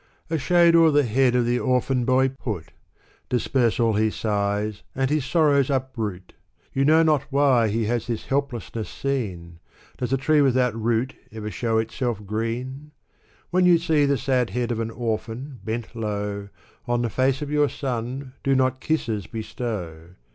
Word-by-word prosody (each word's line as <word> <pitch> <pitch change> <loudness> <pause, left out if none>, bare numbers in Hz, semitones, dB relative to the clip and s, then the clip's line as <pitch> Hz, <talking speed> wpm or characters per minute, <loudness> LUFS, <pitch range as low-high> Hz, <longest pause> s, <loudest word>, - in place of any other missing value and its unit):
A 160 - +1
shade 170 +3 +4
o'er 165 -1 +7
the 145 -1 +4
head 125 +1 +2
of 125 -1 +3
the 120 +1 +1
orphan 125 -1 +1
boy 130 +1 +3
put! 110 -11 -6 0.6
Disperse 125 -1 +1
all 115 -2 +3
his 110 +1 +1
sighs 105 0 -1
and 135 +1 0
his 150 -3 +1
sorrows 145 -2 +3
uproot! 120 -9 -3 0.4
You 135 +1 +2
know 160 +2 +5
not 150 -3 +2
why 135 -5 +4
he 110 +1 0
has 120 +1 -1
this 115 -2 -3
helplessness 130 -5 -2
seen! 95 -12 -4 0.4
Does 125 -1 -2
a 135 - +3
tree 150 +3 +3
without 130 -3 +3
root 115 +3 0 0.2
ever 105 -1 -6
show 115 +3 0
itself 110 -1 -2
green? 125 +7 -4 0.6
When 180 0 +4
you 175 -1 +7
see 160 -3 +2
the 140 0 +2
sad 125 -1 +1
head 120 0 -2
of 115 - -2
an 115 0 -2
orphan 115 +3 -4
bent 115 +1 -4
low. 105 -2 -3 0.4
On 120 0 +1
the 120 - 0
face 130 +5 +1
of 145 - -6
your 150 -1 +3
son, 130 0 -4
do 135 0 +2
not 130 0 +1
kisses 110 - -1
bestow 90 -7 -6
125 Hz, 170 wpm, -24 LUFS, 110-135 Hz, 0.6 s, o'er